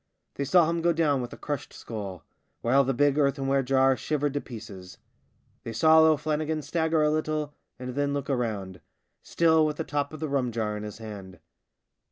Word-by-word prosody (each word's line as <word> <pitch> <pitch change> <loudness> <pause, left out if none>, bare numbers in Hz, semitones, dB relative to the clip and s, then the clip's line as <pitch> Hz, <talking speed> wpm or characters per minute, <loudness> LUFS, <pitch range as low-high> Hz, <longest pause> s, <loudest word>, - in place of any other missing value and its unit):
They 140 - -3
saw 170 +3 +5
him 170 0 -1
go 170 +1 +3
down 150 -5 +1
with 120 - -6
a - - -9
crushed 145 -3 -5
skull, 100 -7 -7 0.4
while 135 +4 +4
the 135 - 0
big 145 +3 +2
earthenware 135 -1 +2
jar 135 0 +3
shivered 145 +3 -1
to 145 - -1
pieces. 105 -6 -10 0.6
They 115 - -6
saw 160 +7 +5
O'Flannigan 155 0 +2
stagger 160 0 +1
a 150 - +3
little 155 -1 -2 0.2
and 125 0 -6
then 145 +1 0
look 140 -1 -3
round 105 -8 -3 0.2
— - - -51
still 160 -1 +3
with 150 -1 -1
the - - -2
top 145 -1 -2
of 155 - -8
the 155 - -2
rum 135 -4 0
jar 110 -2 -2
in 105 - -5
his 105 0 -7
hand. 100 -5 -9
140 Hz, 195 wpm, -27 LUFS, 115-155 Hz, 0.6 s, saw